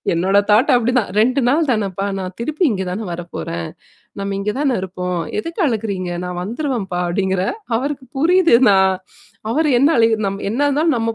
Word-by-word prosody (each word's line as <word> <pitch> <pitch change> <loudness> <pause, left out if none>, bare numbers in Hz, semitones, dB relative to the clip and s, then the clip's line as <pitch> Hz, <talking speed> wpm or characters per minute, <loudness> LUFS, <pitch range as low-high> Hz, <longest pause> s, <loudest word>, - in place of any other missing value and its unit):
என்னோட 190 +4 +2
தாட் 215 +4 +4
அப்டிதான் 245 -3 +1
"2 255 +5 +2
நாள் 300 +2 +2
தானப்பா. 200 -3 -1
நான் 185 -1 -5
திருப்பி 305 +8 -3
இங்க 190 -3 -2
தானே 210 +4 -4
வரப்போறேன். 85 - -5 0.5
நம்ம 200 0 -3
இங்க 210 +1 -1
தானே 275 -4 +1
இருப்போம். 180 -1 -3 0.2
எதுக்கு 335 - -4
அழகுறீங்க? 200 -7 -2 0.2
நான் 180 0 -4
வந்துருவேன்ப்பா" 225 - -3
அப்படிங்கிற. 190 +1 0 0.3
அவருக்கு 275 +1 -3
புரியுது 340 -3 +5
நான். 190 -1 +4 0.6
அவரு 310 +2 +1
என்ன 285 +4 +5
அழுகு 225 -1 +4
நம் 195 +1 -5
என்ன 255 - -2
இருந்தாலும் 300 0 +2
நம்ம 225 0 -1
215 Hz, 160 wpm, -19 LUFS, 190-270 Hz, 0.6 s, புரியுது